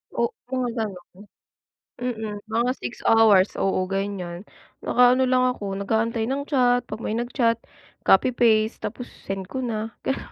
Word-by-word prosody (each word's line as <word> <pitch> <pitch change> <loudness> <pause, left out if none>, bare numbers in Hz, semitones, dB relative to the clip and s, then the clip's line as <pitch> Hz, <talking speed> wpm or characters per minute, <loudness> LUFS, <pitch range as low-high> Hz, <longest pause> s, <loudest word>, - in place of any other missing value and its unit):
O 460 - +1 0.2
mga 255 -2 0
gano'n. 200 -1 -7 0.8
Mm, 220 -4 -3
mga 235 +3 +1
6 245 - -7
hours. 215 -4 +5
Oo, 185 -1 0
ganyan. 195 -2 -4 0.4
Naka-ano 250 +1 +4
lang 255 0 +3
ako, 195 -1 -5
nag-aantay 225 +2 0
ng 275 +2 -1
chat 245 -3 +3
‘pag 215 - -5
may 215 - -2
nag-chat. 235 -1 0 0.4
Copy 240 +6 +4
paste 220 -2 +2
tapos 245 +3 -5 0.2
send 195 -1 -4
ko 260 +5 -4
na 225 -2 -3
gano 270 - -1
225 Hz, 145 wpm, -24 LUFS, 200-245 Hz, 0.8 s, hours